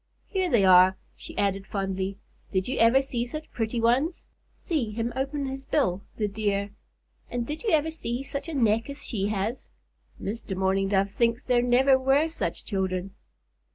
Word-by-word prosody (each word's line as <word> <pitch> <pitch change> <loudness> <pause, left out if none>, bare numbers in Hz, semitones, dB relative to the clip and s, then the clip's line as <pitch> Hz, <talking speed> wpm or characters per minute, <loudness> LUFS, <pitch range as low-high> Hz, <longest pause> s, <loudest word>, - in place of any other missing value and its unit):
"Here 375 -3 -1
they 220 - +4
are," 185 0 +7 0.2
she - - -10
added, 195 -1 0
fondly. 195 -1 -2 0.3
"Did 185 -1 0
you 260 - -2
ever 230 +4 +5
see 245 -3 -2
such 305 +6 -7
pretty 225 +1 -2
ones? 255 +9 +1 0.3
See 300 - -1
him 230 +2 -3
open 275 +2 -2
his 270 0 -5
bill, 200 - +1 0.2
the 210 - 0
dear! 200 -1 -1 0.6
And 240 -1 -2
did 300 +5 -5
you 465 - -1
ever 315 -2 +2
see 250 -5 -3
such 280 +3 -5
a 320 - -4
neck 230 -1 +2
as 280 0 -6
she 200 -4 -1
has? 215 +4 -3 0.5
Mr. 200 -2 -4
Mourning 190 +1 +1
Dove 195 0 +1
thinks 235 +2 +1
there 245 -1 +3
never 260 +2 +4
were 270 +4 +3
such 325 - -3
children." 190 -2 -2
230 Hz, 175 wpm, -27 LUFS, 195-270 Hz, 0.6 s, are